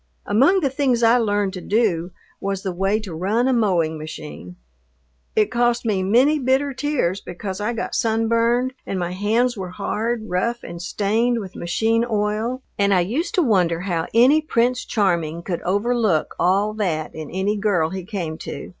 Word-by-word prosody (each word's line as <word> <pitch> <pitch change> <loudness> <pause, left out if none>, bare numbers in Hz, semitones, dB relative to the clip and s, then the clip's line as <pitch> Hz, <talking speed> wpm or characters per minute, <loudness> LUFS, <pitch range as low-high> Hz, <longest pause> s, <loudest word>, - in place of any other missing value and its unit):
Among 280 - +4
the 280 - +1
things 260 -4 +1
I 230 +2 +5
learned 205 -3 0
to 185 - -6
do 190 -6 +1 0.3
was 195 -1 -3
the 190 - -2
way 195 +4 0
to 195 -6 -7
run 205 +9 0
a 265 - +3
mowing 175 -9 +1
machine. 150 - -8 0.8
It 215 -1 +2
cost 240 0 +1
me 205 -4 +1
many 250 +11 +3
bitter 270 +2 +1
tears 255 -10 -1
because 190 +1 -6
I 225 +3 -1
got 230 - -4
sunburned, 230 +2 +1
and 195 - -4
my 175 -1 -2
hands 225 +6 +1
were 190 -3 -5
hard, 220 +4 -2
rough, 235 +6 -1
and 170 0 -8
stained 220 +6 0
with 190 -3 -8
machine 225 +7 +1
oil, 215 +4 -1 0.2
and 200 -1 +3
I 180 - +4
used 275 - -2
to 360 - +3
wonder 180 - +2
how 175 -4 -2
any 260 +7 +5
Prince 250 -4 0
Charming 170 -5 0
could 175 -2 -3
overlook 205 -3 +1
all 195 +4 +2
that 175 -8 -2
in 155 -2 -7
any 190 +3 -1
girl 195 -6 +1
he 190 -1 -5
came 170 -5 -5
to. 140 - -7
210 Hz, 175 wpm, -22 LUFS, 180-235 Hz, 0.8 s, I